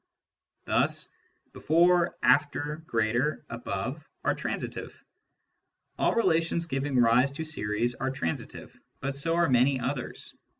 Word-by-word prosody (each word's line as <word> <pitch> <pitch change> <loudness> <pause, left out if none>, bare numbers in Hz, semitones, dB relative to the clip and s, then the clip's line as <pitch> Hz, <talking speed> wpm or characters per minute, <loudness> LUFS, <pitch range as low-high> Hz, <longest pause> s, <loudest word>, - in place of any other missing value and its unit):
Thus - - +1 0.4
before^ 175 +2 +3
after^ 150 +1 +2
greater^ 120 +5 0
above 115 +5 -4 0.2
are - - +2
transitive. - - -5 1.0
All - - +2
relations 165 -6 +2
giving 135 -2 -1
rise 120 +3 +4
to 160 +3 -4
series 115 -5 -1
are 135 +2 -2
transi 135 -12 -3
tive, - - -11 0.2
but 135 +1 -3
so 165 +4 -1
are 170 0 +3
many 130 +1 +3
others. 125 0 -4
140 Hz, 120 wpm, -28 LUFS, 120-160 Hz, 1.0 s, rise